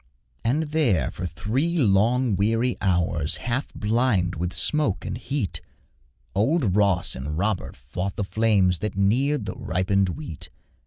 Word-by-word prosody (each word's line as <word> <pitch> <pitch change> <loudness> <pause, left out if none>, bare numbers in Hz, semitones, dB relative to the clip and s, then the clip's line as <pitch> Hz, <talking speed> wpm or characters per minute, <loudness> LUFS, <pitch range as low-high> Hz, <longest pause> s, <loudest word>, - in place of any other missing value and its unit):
And 135 +8 +1
there, 120 - +2
for 90 - -4
three 130 - -1
long 115 0 +3
weary 115 +5 +1
hours, 85 -5 +1
Half 125 +3 -3
blind 105 -5 +1
with 90 +2 -3
smoke 115 - +1
and - - -3
heat, 125 -3 -3 0.7
Old 110 - +2
Ross 100 -4 +2
and 75 +4 -4
Robert 100 +2 -1
fought 90 +10 -5
the 105 - -1
flames 100 -4 +2
That 105 -2 -4
neared 130 +9 +2
the - - -4
ripened 95 +1 0
wheat. 90 - -7
105 Hz, 140 wpm, -24 LUFS, 90-125 Hz, 0.7 s, long